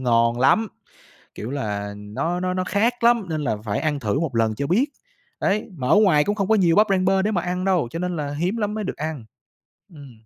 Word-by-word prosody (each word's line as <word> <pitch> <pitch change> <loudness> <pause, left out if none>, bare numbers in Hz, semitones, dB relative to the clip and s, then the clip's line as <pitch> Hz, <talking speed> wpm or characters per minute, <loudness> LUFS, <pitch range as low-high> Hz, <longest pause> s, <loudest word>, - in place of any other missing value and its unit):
ngon 115 -1 +2
lắm!" 220 +11 +3 0.7
Kiểu 110 - -6
là, 105 -6 -3
"nó 110 +13 -3
nó 185 0 -1
nó 185 0 -1
khác 230 +5 0
lắm 235 -4 +4
nên 155 -1 -2
là 115 -7 -1
phải 105 -1 -2
ăn 150 -2 -1
thử 110 +5 -1
một 145 -8 -2
lần 110 -1 +2
cho 140 +5 -3
biết." 225 - +2 0.5
Đấy, 205 +2 0
mà 125 -3 -3
ở - - +5
ngoài 175 -9 +4
cũng 205 - 0
không 200 -1 -2
có 220 - +4
nhiều 175 -4 +3
bắp 215 +1 +6
rang 185 -1 +2
bơ 190 0 +3
để 210 - 0
mà 175 -5 0
ăn 180 +1 -2
đâu, 180 -10 +1
cho 165 - -5
nên 180 -1 -2
là 145 -2 -3
hiếm 180 +8 -1
lắm 210 -1 -2
mới 215 -1 -3
được - - -4
ăn. 155 -6 -5 0.7
Ừm. 140 -4 -12
170 Hz, 245 wpm, -22 LUFS, 125-195 Hz, 0.7 s, bắp